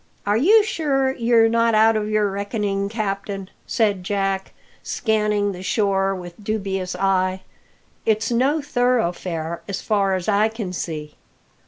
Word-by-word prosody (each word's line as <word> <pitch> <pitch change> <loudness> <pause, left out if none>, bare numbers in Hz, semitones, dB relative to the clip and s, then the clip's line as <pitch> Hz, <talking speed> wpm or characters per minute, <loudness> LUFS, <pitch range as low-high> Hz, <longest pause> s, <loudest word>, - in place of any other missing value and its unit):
"Are 205 0 +2
you 410 - +5
sure 275 -9 0
you're 230 -3 +3
not 230 0 +2
out 220 +1 +5
of 215 0 -1
your 210 -2 +1
reckoning, 200 0 -2
captain?" 200 -3 -4 0.2
said 205 -6 +1
Jack, 195 -1 -1 0.3
scanning 210 -2 0
the 180 -1 -8
shore 195 -1 +1
line 190 - -5
with 175 +3 -11
dubious 195 -4 -2
eye. 185 0 +1 0.6
"It's 220 +1 +1
no 275 +6 +2
thoroughfare, 180 - -1
so 195 - -4
far 200 -3 +1
as 185 -2 -4
I 210 +1 +3
can 220 -5 -5
see." 155 -4 -5
205 Hz, 145 wpm, -22 LUFS, 190-225 Hz, 0.6 s, you